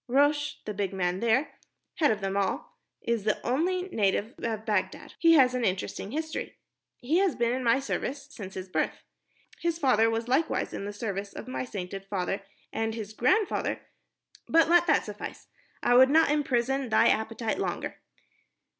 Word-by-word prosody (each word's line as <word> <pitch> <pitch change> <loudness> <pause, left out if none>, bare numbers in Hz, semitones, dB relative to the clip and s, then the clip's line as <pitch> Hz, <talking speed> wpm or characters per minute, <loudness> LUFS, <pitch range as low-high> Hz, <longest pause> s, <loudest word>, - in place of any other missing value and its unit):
Rosh, 290 +3 +2
the 210 - -3
big 200 -1 -2
man 180 0 0
there, 265 +6 +1 0.4
head 300 -3 +4
of 210 -1 0
them 195 0 -2
all, 195 -2 -2 0.2
is 235 -3 0
the 215 0 +1
only 350 +9 +1
native 210 - 0
of 220 -2 -3
Bagdad. 210 -4 -2
He 330 -1 +6
has 260 -5 +6
an 250 -1 -1
interesting 190 0 -2
history. 315 +5 -4 0.4
He 300 +8 +2
has 390 -3 +2
been 235 0 +1
in 255 0 -2
my 240 +3 +4
service 275 0 -3
since 195 -8 -8
his 185 0 -5
birth. 185 - -2 0.6
His 340 -1 -1
father 240 -7 +3
was 225 +1 -2
likewise 305 +6 0
in 200 - -4
the 205 - -4
service 200 -2 -4
of - - -8
my 255 - -3
sainted 195 -3 -6
father, 195 0 -2 0.3
and 225 0 -1
his 220 -2 -6
grandfather.... 310 - +1 0.7
But 330 0 +5
let 345 +1 +5
that 295 - +3
suffice. 210 -1 -7 0.4
I - - +4
would 260 +2 +7
not 320 +1 +5
imprison 270 -2 0
thy 215 - +5
appetite 220 +1 -1
longer. - - -3
235 Hz, 170 wpm, -28 LUFS, 205-285 Hz, 0.7 s, would